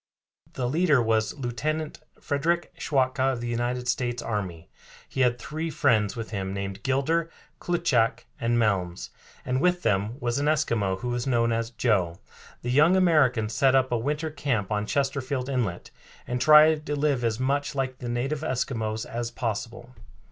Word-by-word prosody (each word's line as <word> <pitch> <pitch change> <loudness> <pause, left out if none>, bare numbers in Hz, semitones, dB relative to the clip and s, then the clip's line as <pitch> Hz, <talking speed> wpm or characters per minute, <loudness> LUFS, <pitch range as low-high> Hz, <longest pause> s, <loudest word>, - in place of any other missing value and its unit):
The 125 - -2
leader 155 +1 +3
was 110 +3 +1
Lieutenant 150 +5 -3 0.2
Frederick 165 +5 -1
Schwatka, 130 -1 +1
of 120 - -4
the 120 - -4
United 120 +1 -2
States 120 -1 -1
Army. 95 -7 -4 0.4
He 135 - -3
had 125 -1 +3
three 155 +5 -4
friends 110 -10 +2
with 115 -2 -6
him 95 -2 -3
named 100 0 -5
Gilder, 145 +7 0 0.3
Klutschak, 135 -10 +1
and 120 -1 +1
Melms, 90 - 0 0.3
and 130 +1 0
with 180 0 +2
them 105 +4 0
was 120 0 -1
an 145 - 0
Eskimo, 110 -11 +1
who 125 - -3
was 120 +1 -2
known 115 -2 +2
as 115 0 -1
Joe. 100 -8 0 0.5
The 120 - -2
young 155 +7 +5
Americans 140 -12 +3
set 135 +2 +3
up 130 -1 +2
a 120 - +2
winter 150 +5 -2
camp 125 -9 -2
on 105 0 -1
Chesterfield 135 -1 -1
Inlet, 120 -10 -2 0.3
and 125 0 -3
tried 155 0 +7
to 145 - -1
live 140 -4 +1
as 115 0 0
much 140 +3 -1
like 130 -2 -2
the 120 - -5
native 135 +5 -2
Eskimos 115 -6 -2
as 120 0 -4
possible. 120 +1 -5
125 Hz, 165 wpm, -26 LUFS, 115-145 Hz, 0.5 s, tried